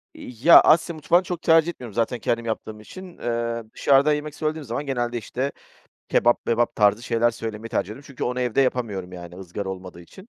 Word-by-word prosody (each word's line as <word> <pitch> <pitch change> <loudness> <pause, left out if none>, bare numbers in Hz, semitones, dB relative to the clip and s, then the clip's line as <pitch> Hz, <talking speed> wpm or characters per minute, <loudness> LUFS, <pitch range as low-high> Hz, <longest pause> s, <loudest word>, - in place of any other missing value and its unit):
Ya, 125 +8 +5
Asya 165 +2 +3
mutfağını 170 +4 +2
çok 175 -1 -5
tercih 165 0 +4
etmiyorum 125 - -8
zaten 120 +2 -1
kendim 115 +1 -1
yaptığım 110 -1 -5
için. 180 - -11
Eee, 115 0 -2
dışarıda 140 +2 +4
yemek 150 0 -4
söylediğim 155 0 -3
zaman 125 +5 -4
genelde, 120 -3 -2
işte, 130 +4 -3 0.6
kebap 120 0 +2
mebap 120 0 +1
tarzı 105 +1 +3
şeyler 120 0 +1
söylemeyi 115 -1 -6
tercih - - 0
ediyorum 120 +7 -10
çünkü 140 -3 -6
onu 125 +1 -2
evde 125 +1 +1
yapamıyorum. 105 -9 -1
Yani, 85 -1 -9
ızgara 95 +1 -6
olmadığı 95 -2 -8
için, 190 - -15
120 Hz, 185 wpm, -23 LUFS, 110-145 Hz, 0.6 s, Ya